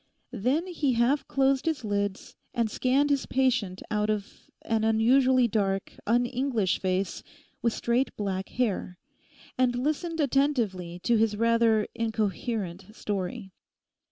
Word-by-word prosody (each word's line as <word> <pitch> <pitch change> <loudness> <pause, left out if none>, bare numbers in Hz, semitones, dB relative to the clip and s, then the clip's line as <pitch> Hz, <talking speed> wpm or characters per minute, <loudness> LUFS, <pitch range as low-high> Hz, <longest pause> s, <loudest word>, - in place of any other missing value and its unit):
Then 255 - 0
he 315 -7 0
half 245 +5 +2
closed 270 +1 +1
his 305 -7 -1
lids, 205 -1 -2 0.2
and 230 -2 0
scanned 275 +5 +2
his 280 -2 0
patient 250 -8 0
out 210 0 0
of 210 -2 -4
an 225 -1 0
unusually 250 +3 +4
dark, 195 -3 -1
un 240 +3 +3
English 240 -6 0
face, 185 +1 -1 0.4
with 235 -2 +1
straight 240 +3 0
black 195 -2 -3
hair, 205 -7 -2 0.6
and 250 -1 +3
listened 310 +6 -2
attentively 240 - 0
to 235 -1 +3
his 215 -1 +1
rather 230 -1 +3
incoherent 220 -3 -3
story. 195 -2 -4
230 Hz, 130 wpm, -27 LUFS, 205-260 Hz, 0.6 s, unusually